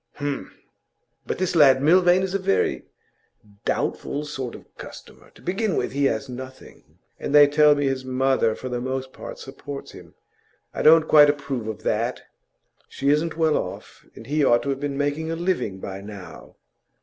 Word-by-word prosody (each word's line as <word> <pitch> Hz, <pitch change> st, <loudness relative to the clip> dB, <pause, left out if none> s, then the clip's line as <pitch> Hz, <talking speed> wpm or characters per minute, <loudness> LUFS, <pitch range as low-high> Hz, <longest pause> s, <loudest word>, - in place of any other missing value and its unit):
'H'm! 145 Hz, -1 st, -4 dB, 0.8 s
But -, -, -2 dB
this 185 Hz, -1 st, -1 dB
lad 135 Hz, -4 st, +6 dB
Milvain 175 Hz, +5 st, +4 dB
is 190 Hz, -1 st, -3 dB
a 195 Hz, -, 0 dB
very 195 Hz, +1 st, 0 dB, 0.8 s
doubtful 145 Hz, +1 st, -2 dB
sort 135 Hz, -5 st, -5 dB
of -, -, -13 dB
customer. -, -, -12 dB
To -, -, -18 dB
begin 195 Hz, +1 st, -1 dB
with, -, -, -1 dB
he 140 Hz, +1 st, 0 dB
has 135 Hz, 0 st, 0 dB
nothing, 130 Hz, +1 st, -11 dB, 0.2 s
and 145 Hz, -, -2 dB
they 145 Hz, 0 st, +9 dB
tell 150 Hz, +1 st, +4 dB
me 145 Hz, 0 st, -1 dB
his 135 Hz, -1 st, -1 dB
mother 130 Hz, -3 st, +1 dB
for 130 Hz, -, -7 dB
the 125 Hz, -1 st, -3 dB
most 130 Hz, +1 st, -4 dB
part -, -, -9 dB
supports 140 Hz, +1 st, -9 dB
him. -, -, -14 dB, 0.6 s
I -, -, -3 dB
don't 160 Hz, 0 st, +6 dB
quite 150 Hz, -1 st, +7 dB
approve 140 Hz, -6 st, -3 dB
of 110 Hz, -1 st, -6 dB
that. 115 Hz, +4 st, -1 dB, 0.7 s
She 140 Hz, -, -2 dB
isn't 155 Hz, +3 st, +1 dB
well 160 Hz, -2 st, +2 dB
off, 90 Hz, -, -7 dB
and -, -, -11 dB
he 150 Hz, +1 st, 0 dB
ought 120 Hz, -3 st, +4 dB
to 140 Hz, -, -3 dB
have 135 Hz, -, -3 dB
been 140 Hz, -1 st, -3 dB
making 145 Hz, +3 st, -1 dB
a 165 Hz, -, -2 dB
living 170 Hz, -, -2 dB
by 95 Hz, 0 st, -7 dB
now. 100 Hz, -5 st, -11 dB
140 Hz, 180 wpm, -23 LUFS, 130-155 Hz, 0.8 s, they